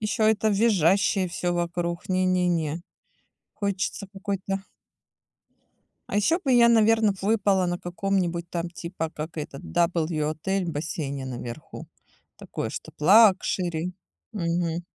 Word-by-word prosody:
Ещё 215 +1 0
это 220 0 +3
визжащее 195 -2 +3
всё 175 0 -2
вокруг, 175 0 -2
не-не-не, 180 -4 +1 0.7
хочется 200 0 -3
какой-то 195 0 -3 1.5
А - - -1
ещё 320 - +3
бы 275 - 0
я, 235 -1 +6
наверно, 220 -2 +4
б - - -13
выпала 200 -2 +2
на 175 0 -2
каком-нибудь, 175 -1 -2
там, 170 0 -3
типа, 170 -2 -5
как 155 +2 -6
этот 145 -2 -6
W 155 - 0
отель, 190 +5 -2
в 170 - -3
бассейне 145 -3 -4
наверху. 125 +2 -7 0.5
Такое, - - -5
чтоб - - -8
лакшери, 180 -2 +4 0.4
мгм. 170 0 -1
180 Hz, 120 wpm, -25 LUFS, 165-200 Hz, 1.5 s, я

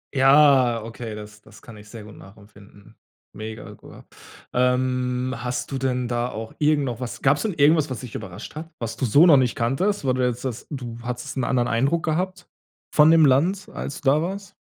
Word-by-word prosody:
Ja, 135 -4 +5
okay, 115 -1 -7
das 105 0 -11
das 105 0 -18
kann 115 - -12
ich 105 0 -14
sehr 110 -1 -10
gut 105 0 -13
nachempfinden. 100 +1 -17 0.4
Mega, 110 +1 -8
gu - - -14 0.5
ähm, 125 0 0
hast 125 +1 -4
du 135 - -3
denn 125 -1 -1
da 120 0 -1
auch 110 -1 -7
irgend 150 -1 +2
noch 120 -3 -4
was 125 -4 -7
gab 140 +2 +4
es - - -5
denn 215 -3 -1
irgendwas, 155 0 +3
was 125 -4 -5
dich 125 -3 -9
überrascht - - -8
hat? 160 +2 -7
Was 115 -1 -5
du 130 - -2
so 140 +8 +5
noch 160 -5 +7
nicht 125 -3 +1
kanntest? 140 - -1
Weil 130 - +2
du 125 0 +1
jetzt 125 0 -4
sagst, 125 -3 -5
du 120 -5 -7
hattest 125 0 -6
'n 130 - 0
anderen 120 0 +1
Eindruck 140 +8 0
gehabt 180 +3 -2 0.5
von 150 +1 +6
dem 165 -1 +6
Land, 170 +9 +2
als 140 - -6
du 140 - +2
da 150 +2 +2
warst? 195 +4 -5
125 Hz, 210 wpm, -23 LUFS, 115-145 Hz, 0.5 s, noch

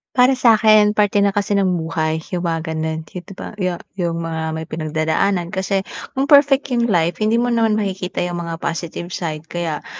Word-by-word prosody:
Para 255 +1 +5
sa'kin 215 -4 +4
parte 205 -1 +3
na 200 - +4
kasi 205 +1 -1
ng 200 -2 +2
buhay 160 -1 -1 0.2
yung 175 - -1
mga 160 0 -3
ganun, 160 0 -3
yun, 180 +3 -8
di 195 - -8
ba, - - -7
yung 180 -1 0 0.2
yung 170 -3 -2
mga 160 -1 -3 0.2
may 160 - -5
pinagdadaanan. 160 +3 -1
Kasi 190 0 -1 0.3
kung 270 - +2
perfect 285 -1 +5
yung 235 -1 +1
life, 175 0 +1
hindi 220 +2 +2
mo 240 0 +1
naman 225 -2 +2
makikita 190 -3 -3
yung 175 -1 -3
mga 165 -1 -5
positive 170 +1 -5
side. 155 -2 -4
Kaya 165 -3 -4
180 Hz, 190 wpm, -19 LUFS, 165-215 Hz, 0.3 s, Para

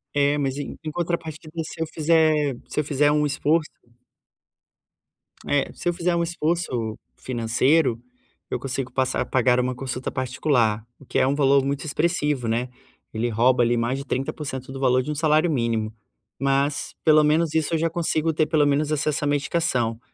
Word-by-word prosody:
É 145 +1 +3
mas 135 -1 -1
em 145 - -6
em 155 - -4
contrapartida 165 -2 -4
se 160 - -8
eu 160 - 0
fizer 155 -3 +2
se - - -3
eu - - +2
fizer 145 0 +2
um 150 0 +2
esforço 150 +2 +1 1.8
é 145 -1 +1
se 175 - -2
eu - - 0
fizer 175 0 0
um 170 - +1
esforço 155 -9 -2 0.2
financeiro, 125 +2 +1 0.5
eu - - -2
consigo 130 -1 -4
passar 130 0 0
pagar 125 -1 +2
uma 125 0 -1
consulta 130 0 -4
particular, 125 -4 0
o 140 - -16
que - - -3
é - - +4
um 140 - +1
valor 140 -1 +4
muito 140 +2 -2
expressivo, 150 -5 0
né, 120 +3 -1 0.4
ele 115 +2 -1
rouba 120 +2 +3
ali 120 +1 +2
mais 120 +3 0
de 140 - -7
trinta 135 +3 -2
por 150 - -7
cento 130 -1 -6
do 135 - -7
valor 130 -1 +3
de 150 - -4
um - - -3
salário 155 +2 +3
mínimo. 115 -4 -1 0.5
Mas 140 +2 0
pelo 155 -1 +6
menos 155 +1 +2
isso 160 +1 +1
eu - - +2
já 165 - +1
consigo 165 -1 0
ter 155 0 +1
pelo 150 -3 +3
menos 145 +2 +1
acesso 150 0 0
à - - +1
medicação. 140 -6 0
145 Hz, 185 wpm, -24 LUFS, 130-155 Hz, 1.8 s, pelo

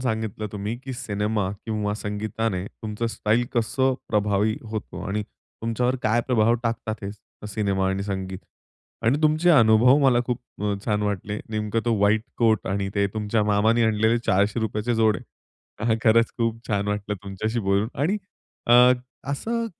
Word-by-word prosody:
सांगितलं 110 -3 -2
तुम्ही, 105 +2 -3
की 130 0 -7
सिनेमा 105 -4 -1
किंवा 105 -2 -1
संगीताने 105 -2 -3
तुमचं 110 +2 -5
स्टाईल 115 +1 +1
कसं 130 +3 +2
प्रभावी 105 0 +1
होतो 110 -1 -5
आणि 105 +2 -1
तुमच्यावर 115 +4 -3
काय 110 +2 +2
प्रभाव 115 -1 +4
टाकतात 115 -2 -2
हे 100 - -4 0.4
सिनेमा 100 -2 0
आणि 95 +1 -1
संगीत. 95 -2 -4 0.6
आणि 125 +6 +3
तुमचे 155 +3 +4
अनुभव 120 -1 +6
मला 125 -3 +5
खूप 125 -1 -1 0.2
अ, 105 -1 +1
छान 105 -2 0
वाटले. 105 0 -2
नेमकं 110 +1 -1
तो 120 -1 +2
व्हाईट 105 +2 +3 0.2
कोट 110 -3 +2
आणि 95 0 -1
ते 100 -1 +2
तुमच्या 105 0 0
मामांनी 105 +3 +3
आणलेले 110 +1 +3
₹400 105 +3 +1
चे 120 +2 0
जोडे 110 -4 +3 0.7
हां, 115 -1 +3
खरंच 115 +1 +4
खूप 115 -1 0
छान 100 -1 0
वाटलं 105 0 -2
तुमच्याशी 105 +4 -3
बोलून. 100 +3 +2
आणि 165 +10 0 0.5
अ, 125 +1 +7 0.4
असं 230 +11 -2
110 Hz, 150 wpm, -24 LUFS, 105-115 Hz, 0.7 s, अ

